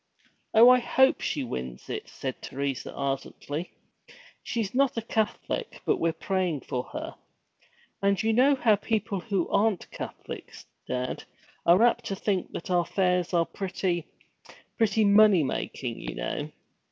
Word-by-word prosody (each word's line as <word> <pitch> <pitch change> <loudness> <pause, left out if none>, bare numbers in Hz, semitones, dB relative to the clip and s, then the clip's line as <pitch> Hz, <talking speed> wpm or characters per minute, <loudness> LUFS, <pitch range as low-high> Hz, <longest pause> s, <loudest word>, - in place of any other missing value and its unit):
'Oh, 225 +2 +9
I 255 0 +7
hope 265 +2 +3
she 145 - -1
wins 65 - -6
it,' - - -5
said 130 -2 -5
Teresa 140 -1 -3
ardently. 140 +3 -4 0.7
'She 230 -2 -2
's 205 +2 -6
not 265 -1 +2
a - - +1
Catholic, 225 - -2
but - - +2
we're 165 - +1
praying 180 -3 -1
for 125 0 -3
her. - - -6 0.9
And 200 0 +2
you 225 0 +2
know 265 +5 +5 0.2
people 210 -2 -1
who 195 -2 -1
aren't 205 -2 +1
Catholics, - - -8 0.2
dad, 125 0 -3 0.4
are 180 +6 +6
apt 240 0 +3
to 195 - -2
think 195 -2 -1
that 175 - -5
our 175 -1 +3
fairs 180 -2 +1
are 170 -2 +3
pretty 180 -3 -2 0.7
pretty 220 -1 +2
money 200 -4 +6
making, 125 -2 -3
you - - -6
know!' - - -3
190 Hz, 145 wpm, -27 LUFS, 150-220 Hz, 0.9 s, Oh